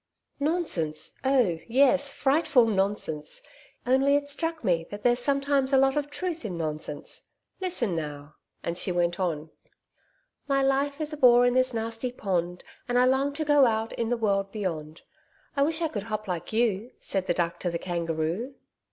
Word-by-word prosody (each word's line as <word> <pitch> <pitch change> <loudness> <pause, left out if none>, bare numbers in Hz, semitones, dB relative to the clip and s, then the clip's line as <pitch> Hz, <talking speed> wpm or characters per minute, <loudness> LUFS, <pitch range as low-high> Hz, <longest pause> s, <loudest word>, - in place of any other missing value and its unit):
'Nonsense 285 - -1
oh 250 -11 +2
yes, 275 +3 +3
frightful 280 -3 +3
nonsense. 195 - -2 0.4
Only 270 +3 +4
it 285 0 0
struck 325 +2 -2
me 165 -3 +1
that 205 0 -8
there's 245 0 +3
sometimes 275 0 +1
a - - +7
lot 270 0 +4
of 295 -1 -1
truth 335 +1 -4
in 190 -6 -4
nonsense. 155 -2 -5 0.3
Listen 340 - -1
now,' 150 -2 -5 0.3
and 170 +1 -3
she 185 - 0
went 175 0 0
on: 160 -4 -2 1.0
'"My 275 -1 +2
life 280 +2 +1
is 305 0 -3
a - - -5
bore 245 -3 +6
in 245 - +3
this 255 0 +3
nasty 230 +1 -3
pond, 180 -6 -2 0.3
And 245 - +2
I 250 - +5
long 265 +2 +2
to 310 +2 -3
go 290 -3 +5
out 220 0 -1
in 230 -1 -2
the 245 - +1
world 195 -3 0
beyond. 165 -7 -4 0.5
I 280 - +1
wish 320 +3 +1
I - - +2
could 220 -9 -4
hop 215 -1 -3
like 175 -3 -4
you!" 225 0 0
Said 190 -1 -3
the 175 - +1
Duck 170 -1 -1
to 180 - -1
the 170 - -2
Kangaroo.' 170 - -2
235 Hz, 180 wpm, -27 LUFS, 175-275 Hz, 1.0 s, a